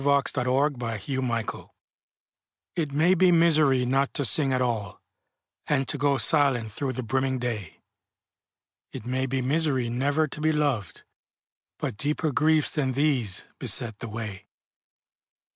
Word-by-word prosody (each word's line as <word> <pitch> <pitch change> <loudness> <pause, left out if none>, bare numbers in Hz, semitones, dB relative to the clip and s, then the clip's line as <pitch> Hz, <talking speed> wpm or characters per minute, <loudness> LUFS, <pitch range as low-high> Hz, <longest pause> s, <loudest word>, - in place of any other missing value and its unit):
Paul 145 - +1
Laurence 140 - +1
Dunbar 130 +3 +1
Life's 115 -4 -4
Tragedy 125 -4 -3 1.1
IT 155 -4 -2
may 160 +6 +3
be 185 0 +4
misery 155 -6 +4
not 135 +2 +1
to 140 - 0
sing 135 +5 +3
at 130 - +1
all, 115 -6 -2 0.7
And 135 -3 0
to - - -2
go 145 -1 +2
silent 135 -8 +2
through 130 +4 -3
the 130 - -4
brimming 130 +3 -1
day; 115 -8 -5 1.1
It - - -8
may 130 +1 -1
be 130 0 -2
misery 135 -3 +1
never 140 +6 +1
to 150 - -9
be 155 0 +2
loved, 140 - -1 0.7
But - - -4
deeper 150 +4 -1
griefs 155 +2 +2
than 135 -4 0
these 130 -9 0
beset 110 -4 +2
the 115 - -6
way. 105 -3 -7
130 Hz, 145 wpm, -26 LUFS, 120-145 Hz, 1.1 s, be